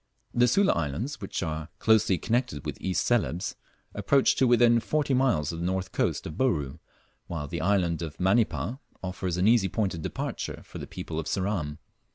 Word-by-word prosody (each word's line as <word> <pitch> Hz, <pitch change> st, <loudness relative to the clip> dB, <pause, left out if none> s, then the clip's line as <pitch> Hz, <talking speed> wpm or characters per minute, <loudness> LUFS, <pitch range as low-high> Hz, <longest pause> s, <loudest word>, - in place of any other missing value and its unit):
The 120 Hz, 0 st, +4 dB
Sula 195 Hz, -, +4 dB
Islands, 85 Hz, -, -3 dB
which 100 Hz, -, -3 dB
are 80 Hz, -1 st, -4 dB
closely 110 Hz, -4 st, +3 dB
connected 120 Hz, -, -1 dB
with -, -, -5 dB
East 95 Hz, -1 st, 0 dB
Celebes, 90 Hz, -, 0 dB, 0.4 s
approach 140 Hz, -1 st, +3 dB
to 130 Hz, -, +4 dB
within 120 Hz, -1 st, +5 dB
forty 145 Hz, +3 st, 0 dB
miles 125 Hz, -, +2 dB
of 85 Hz, -, -6 dB
the 85 Hz, -, -2 dB
north 95 Hz, 0 st, -2 dB
coast -, -, 0 dB
of 80 Hz, -, -5 dB
Bouru, 80 Hz, -, 0 dB, 0.5 s
while 80 Hz, -4 st, -4 dB
the 85 Hz, +4 st, -4 dB
island 90 Hz, -5 st, +1 dB
of 80 Hz, -3 st, -5 dB
Manipa 110 Hz, +4 st, +1 dB, 0.2 s
offers 90 Hz, -1 st, -3 dB
an 90 Hz, +3 st, +3 dB
easy 110 Hz, -4 st, +4 dB
point 100 Hz, 0 st, 0 dB
of 85 Hz, -, -6 dB
departure -, -, -4 dB
for -, -, -9 dB
the -, -, -7 dB
people -, -, -5 dB
of -, -, -4 dB
Ceram. 90 Hz, -7 st, -1 dB
95 Hz, 185 wpm, -27 LUFS, 85-120 Hz, 0.5 s, within